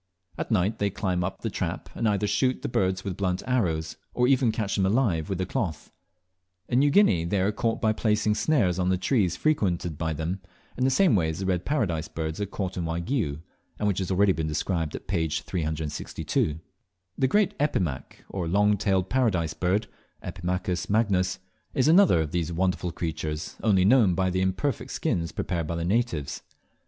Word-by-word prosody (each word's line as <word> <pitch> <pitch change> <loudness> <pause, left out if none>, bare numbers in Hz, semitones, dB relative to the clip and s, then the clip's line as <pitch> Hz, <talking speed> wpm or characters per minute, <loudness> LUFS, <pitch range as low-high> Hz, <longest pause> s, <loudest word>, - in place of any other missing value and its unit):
At - - -4
night 105 -1 +1
they 100 - +1
climb 90 -2 -1
up 95 +2 -4
the 115 - -3
trap, 90 -2 -3
and 115 - 0
either 105 0 +1
shoot 125 +6 +1
the - - -1
birds 95 -4 0
with 95 -3 -3
blunt 90 -2 -1
arrows, 85 -11 0 0.2
or 125 0 +3
even 130 -3 +3
catch 105 -3 -2
them 95 -2 +2
alive 95 - +1
with 95 -2 -2
a 95 - 0
cloth. 95 - -3 0.8
In 125 - +2
New 145 +1 +4
Guinea 140 - +4
they 95 +4 0
are 95 +3 +2
caught 115 +2 -1
by 110 -1 +2
placing 105 -1 +1
snares 105 - +1
on 90 0 +1
the 95 - +2
trees 95 - +1
frequented 90 - 0
by 80 -1 -1
them, 85 +5 -3 0.3
in 130 - 0
the - - +4
same 160 - +4
way 80 -5 +2
as 80 - -4
the 95 - -3
Red 90 -2 0
Paradise 90 - 0
birds 80 +3 -4
are 100 - -1
caught 95 -2 -4
in 85 - -2
Waigiou, 85 - -2 0.4
and 105 - 0
which 100 -2 +1
has 95 - -2
already 100 +1 +4
been 80 -3 -1
described 80 +1 -1
at - - -8
page 80 -4 -1
362. 80 -2 -2 0.6
The 130 - +2
great 205 +8 +2
Epimaque, 90 - -2
or 90 -4 -4
Long 105 +4 +3
tailed 95 -2 +1
Paradise 95 -9 +1
Bird 95 +4 0 0.4
(Epimachus 90 0 -3
magnus), 100 -4 +2 0.4
is 130 - +3
another 165 - +6
of 75 -2 -3
these 85 -1 -1
wonderful 90 0 0
creatures, 80 -2 -4
only 95 -4 +3
known 105 -5 +5
by 95 +1 +1
the 95 +1 0
imperfect 95 +8 -1
skins 85 -2 -1
prepared 85 -1 -2
by 85 - -2
the 85 0 -2
natives. 100 - -1
95 Hz, 190 wpm, -26 LUFS, 85-110 Hz, 0.8 s, another